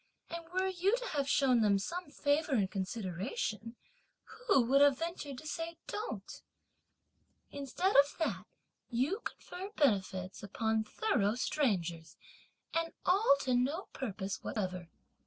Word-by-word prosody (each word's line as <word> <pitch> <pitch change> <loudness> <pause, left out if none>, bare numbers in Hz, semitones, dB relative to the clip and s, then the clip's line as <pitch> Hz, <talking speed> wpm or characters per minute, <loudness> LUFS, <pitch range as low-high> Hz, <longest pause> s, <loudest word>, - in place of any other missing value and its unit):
and 335 0 -4
were 375 +1 +1
you 380 +4 +2
to - - -5
have 280 -2 -1
shown 255 -5 +4
them 205 -2 +4
some 340 - -4
favour 290 +1 +1
and 200 -6 +2
consideration, 205 - -3 0.7
who 395 - +6
would 270 +4 +4
have 285 -2 +6
ventured 325 -5 -4
to 305 - -9
have - - -8
said 330 0 -4
'don't?' 430 +2 -5 1.1
Instead 285 +7 -1
of 280 +1 +6
that, 325 - -2 0.4
you 265 - 0
confer 375 +3 -7
benefits 190 -8 +1
upon 220 +2 0
thorough 215 - +1
strangers, 175 - -1 0.6
and 330 0 0
all 370 -4 +5
to 255 - 0
no 275 +9 0
purpose 200 -6 -4
whatever! 185 -4 -3
270 Hz, 135 wpm, -33 LUFS, 205-335 Hz, 1.1 s, who